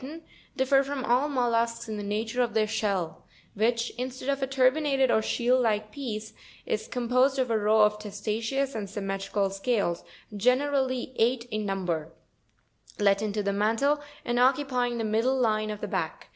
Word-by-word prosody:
79), 315 +5 -9 0.3
differ 270 +1 +4
from 275 -1 -4
all 255 +5 +2
mollusks, 235 -4 0
in 220 - -4
the 210 - -4
nature 220 +4 -2
of 235 -3 -1
their 220 -1 +3
shell, 200 -6 -2 0.3
which, 230 +2 0
instead 255 +1 -4
of 280 0 0
a 270 - 0
tur 260 -1 +4
binated 275 -3 +1
or 220 - +3
shield 245 +3 +2
like 215 -2 0
piece, 220 -6 -5 0.3
is - - -2
com 245 -2 -3
posed 255 +3 +3
of 255 -3 0
a 225 - +3
row 215 +1 +4
of 210 0 +2
testaceous 225 +6 -2
and 205 -3 -4
symmetrical 195 0 -2
scales, 195 -4 -1 0.3
generally 255 +3 +1
eight 235 +1 +2
in 215 -1 -2
number, 175 -5 -2 0.9
let 200 -1 +3
into 210 -1 -1
the 200 0 0
mantle, 225 +9 +1 0.2
and 240 0 0
occupying 250 -2 +2
the 230 - -2
middle 225 +5 +1
line 215 -3 +1
of 210 -1 -5
the - - -3
back. - - -4
230 Hz, 175 wpm, -27 LUFS, 210-260 Hz, 0.9 s, differ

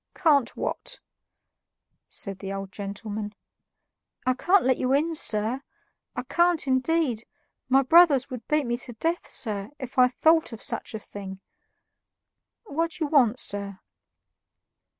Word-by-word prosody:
"Can't 285 -7 +2
what?" - - -4 1.1
said 195 -2 -4
the 195 -1 -6
old 195 -1 -5
gentleman. 205 +1 -5 0.9
"I 255 - +3
can't 360 +8 +3
let 260 -1 +2
you 255 +1 +1
in, 315 +4 +2
sir 230 -3 -1 0.5
I - - -3
can't, 340 +4 +2
indeed; 260 -2 +1 0.5
my 270 +1 +5
brothers 290 -3 +6
would 250 -3 -7
beat 300 -2 +1
me 240 0 -1
to 245 0 -6
death, 330 +9 -2
sir, 205 -3 -1
if 260 -1 -4
I 250 - +7
thought 315 +3 +2
of 225 - -6
such - - -3
a - - -1
thing. 195 -2 -9 1.2
What 330 -5 -2
do 330 - -3
you - - -5
want, 255 -5 +4
sir?" 200 -1 -2
255 Hz, 140 wpm, -26 LUFS, 215-310 Hz, 1.2 s, I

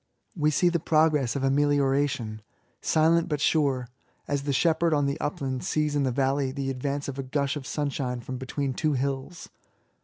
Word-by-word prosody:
We 155 -3 +2
see 175 +4 +3
the 170 -1 0
progress 155 -5 +2
of 140 - -2
amelioration, 140 -4 +1 0.4
silent 165 +2 +3
but 150 -2 -1
sure, 140 -4 +1 0.4
as 145 -1 0
the 140 0 -2
shepherd 165 +3 +2
on 145 -1 +2
the 140 +3 -1
upland 135 -3 -3
sees 150 -1 0
in 145 - +2
the 130 -2 +1
valley 135 +1 +1
the 135 0 -3
advance 140 +2 -3
of 140 0 -5
a - - -2
gush 140 +2 -1
of 140 -3 -6
sunshine 135 -4 -2
from 125 +1 -6
between 135 +1 -2
two 155 +3 0
hills. 135 +5 -3
140 Hz, 180 wpm, -27 LUFS, 135-150 Hz, 0.4 s, see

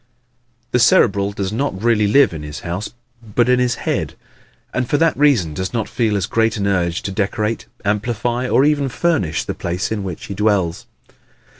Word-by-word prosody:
The 125 - +2
Cerebral 100 -4 +4
does 100 0 -3
not 115 -5 -2
really 110 -1 +2
live 135 0 +4
in 80 - -6
his 75 -1 -7
house 90 +5 -4 0.3
but 115 +1 0
in 125 0 +3
his 125 -1 +1
head, - - -2 0.6
and 130 -2 -1
for 145 - +2
that 165 0 +2
reason 125 - +3
does 95 +7 -4
not 115 -3 -1
feel 110 -4 0
as 95 - -1
great 115 +1 +1
an 100 - -1
urge 90 -3 0
to 100 - -3
decorate, 105 +2 -2 0.2
amplify 120 +4 -1
or 130 +4 +4
even 145 -2 +2
furnish 125 - 0
the - - -4
place 90 +4 -3
in 105 -3 -2
which 90 -4 -6
he - - -6
dwells. 95 -4 0
105 Hz, 185 wpm, -19 LUFS, 95-125 Hz, 0.6 s, Cerebral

